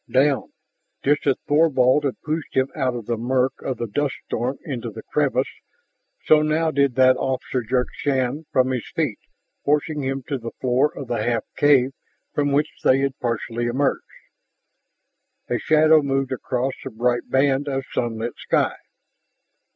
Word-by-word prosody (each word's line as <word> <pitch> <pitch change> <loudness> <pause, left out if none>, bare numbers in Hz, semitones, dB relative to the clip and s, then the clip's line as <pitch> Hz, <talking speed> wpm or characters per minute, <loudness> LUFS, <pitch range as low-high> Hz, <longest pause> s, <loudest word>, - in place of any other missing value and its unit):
"Down!" 135 +1 +2 0.5
Just 145 +1 +2
as 135 - +4
Thorvald 145 -2 +4
had 135 - -2
pushed 155 0 -3
him 130 +1 +3
out 130 -4 0
of 120 -3 -6
the 120 +1 -1
murk 130 +3 0
of 130 - -3
the 120 - -2
dust 140 +6 -1
storm 125 +4 -2
into 130 -6 -4
the - - -9
crevice, - - 0 0.7
so 155 -1 +6
now 155 +1 +1
did 140 -3 +2
that 130 -1 +5
officer 130 -1 -2
jerk 125 +2 0
Shann 140 +2 -1
from 130 0 +2
his 125 -3 -3
feet, 145 -10 -1 0.4
forcing 150 +1 +1
him 135 0 -2
to 140 +1 -3
the 115 0 -7
floor 130 +3 +2
of 140 - -6
the 120 -1 -1
half 120 -1 0
cave 135 -3 +4 0.4
from 145 -1 +1
which 150 +2 +1
they 135 +1 +4
had 135 -1 -2
partially 120 0 -2
emerged. 135 +4 +1 1.5
A - - +1
shadow 155 0 +5
moved 135 -1 -1
across 130 0 -2
the - - -5
bright 120 +1 -1
band 135 +1 +2
of 135 -1 -1
sunlit 115 0 -2
sky. - - +1
135 Hz, 160 wpm, -22 LUFS, 125-145 Hz, 1.5 s, so